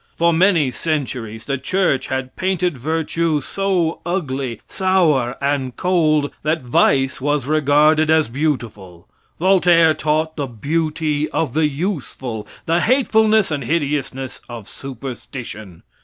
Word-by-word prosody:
For 170 0 +3
many 165 -5 +3
centuries 125 -8 -3
the 140 -2 -2
church 180 -1 0
had 130 0 -4
painted 180 -3 0
virtue 160 +3 -1
so 180 +1 -1
ugly, 135 - -3
sour 160 -10 +1
and 140 -3 -1
cold 155 -5 +2
that 155 -1 -1
vice 135 +2 +2
was 145 0 0
regarded 155 +1 +3
as 160 -1 +4
beautiful. 115 - -4 0.3
Voltaire 175 -3 +5
taught 155 +1 -1
the 140 -2 -2
beauty 150 +4 -1
of 145 -7 -1
the 155 0 +2
useful, 135 - -4 0.2
the 165 +1 +2
hatefulness 220 -3 +3
and 145 -2 -2
hideousness 135 -2 -2
of 115 -4 -8
superstition. 120 -7 -8
150 Hz, 120 wpm, -19 LUFS, 130-165 Hz, 0.3 s, Voltaire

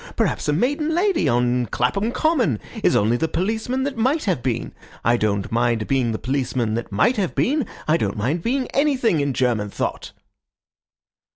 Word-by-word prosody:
Perhaps - - 0
a 150 - +2
maiden 290 - 0
lady 380 0 +2
on 120 0 +1
Clapham 200 - 0
Common 250 - +1 0.2
is - - +4
only 110 +4 +3
the 160 - 0
policeman 220 +10 -1
that 280 -2 -3
might 265 +8 +1
have 180 - 0
been. 120 -2 -2 0.3
I 120 - +4
don't 100 -4 -1
mind 115 -1 +1
being 130 -4 +1
the 110 - -2
policeman 125 -3 -1
that 115 0 -4
might 220 - +2
have 195 -4 -1
been. 285 0 +1 0.2
I 155 +2 +4
don't 100 -9 -2
mind 135 +11 -1
being 255 +6 0
anything 265 - +2
in 140 -1 0
German 115 -5 0
thought." - - -4
145 Hz, 175 wpm, -22 LUFS, -, 0.3 s, is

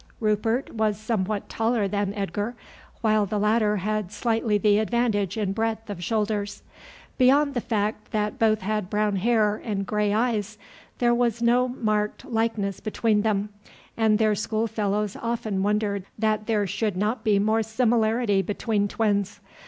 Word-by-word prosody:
Rupert 225 +4 0
was 215 -2 0
somewhat 215 -2 -2
taller 225 -2 0
than 200 0 -1
Edgar, 205 +4 -3 0.5
while 215 -2 +2
the 210 - -2
latter 210 0 +2
had 210 0 -2
slightly 225 -2 0
the 205 0 +3
advantage 220 -4 0
in 200 -3 -1
breadth 225 0 -2
of 180 -3 -6
shoulders. 210 -1 -2 0.6
Beyond 280 +3 +4
the 245 - -1
fact 215 -2 -2
that 210 -1 -2
both 215 -1 +3
had 210 -1 -2
brown 210 -1 +1
hair 215 0 +2
and 200 -3 -2
gray 210 0 0
eyes 215 -1 0 0.4
there 240 -1 +3
was 235 -1 +1
no 245 +2 +4
marked 215 -4 -1
likeness 225 -4 -1
between 215 0 +1
them, 210 -1 0 0.5
and 220 -2 +3
their 215 -1 +3
school 215 +2 -1
fellows 210 -2 -1
often 225 -4 -2
wondered 205 -1 0
that 215 -1 0
there 215 -3 +1
should 205 0 -2
not 215 +3 -1
be 210 -3 +3
more 215 +3 +2
similarity 220 -2 +2
between 205 +2 -1
twins. 205 -2 0
215 Hz, 150 wpm, -25 LUFS, 205-225 Hz, 0.6 s, Beyond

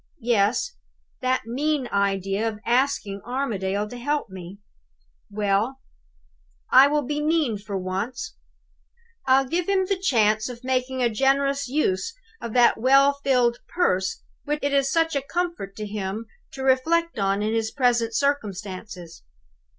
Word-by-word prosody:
Yes; 240 - +1 0.4
that 255 -1 0
mean 275 +3 -1
idea 195 +1 0
of 215 - -7
asking 235 -5 0
Armadale 210 -6 -2
to 245 +3 -9
help 290 -3 -2
me! 185 +1 -9 0.7
Well; 210 +5 0 0.9
I 265 +2 +8
will 295 0 +1
be 295 +3 -2
mean 300 -8 +1
for 200 -1 -5
once. 205 +6 -4 0.9
I'll 265 +1 +5
give 340 +7 -2
him 385 -1 +2
the 380 0 -1
chance 220 - +2
of 245 0 -9
making 255 0 -1
a 240 - +3
generous 275 +3 +1
use 275 - -1 0.3
of 230 - -5
that 240 -2 +4
well 275 +3 +5
filled 245 -3 +3
purse 190 - 0 0.2
which 295 +1 -2
it 285 0 0
is 275 -1 +2
such 325 -2 +1
a 280 - +1
comfort 335 - -3
to 215 - -5
him 205 +1 -4 0.3
to 265 - -6
reflect 320 +4 +2
on 195 +1 +1
in 215 +1 0
his 225 -1 0
present 240 -3 +1
circumstances. 200 - -3
245 Hz, 145 wpm, -24 LUFS, 205-280 Hz, 0.9 s, I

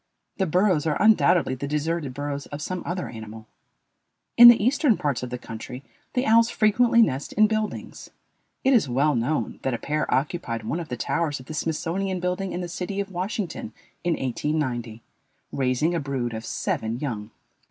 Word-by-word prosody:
The 190 - +1
burrows 180 -2 +2
are 150 - 0
undoubtedly 180 -10 +4
the 130 +2 -4
deserted 150 -2 -2
burrows 145 -1 -4
of 145 - -7
some 185 +4 -4
other 180 +1 -3
animal. 110 -1 -9 0.9
In 240 - +11
the 240 -1 +10
eastern 255 +1 +3
parts 140 -5 -1
of 125 - -5
the 125 - -4
country 120 +3 -8 0.3
the 250 +1 +1
owls 230 +1 +5
frequently 235 +2 +4
nest 135 -6 -2
in 215 - +5
buildings. 215 0 -3 0.5
It 265 - +4
is 210 - +3
well 140 +5 +2
known 125 +6 -1
that 130 -2 -1
a - - -3
pair 150 +5 -2
occupied 130 -4 -1
one 150 +10 -2
of 165 - -7
the 125 - -4
towers 145 +3 -1
of 130 - -12
the 155 - -7
Smithsonian 175 +4 -2
building 180 +2 -2
in 180 - -3
the 175 - -4
city 180 +3 -4
of 200 -1 -3
Washington 185 +2 -4 0.3
in 175 0 +1
1890, 125 -4 -2 0.5
raising 135 +5 0
a 170 - 0
brood 135 -5 -3
of 110 0 -6
seven 110 +1 -2
young. 110 -8 -4
155 Hz, 180 wpm, -25 LUFS, 130-190 Hz, 0.9 s, In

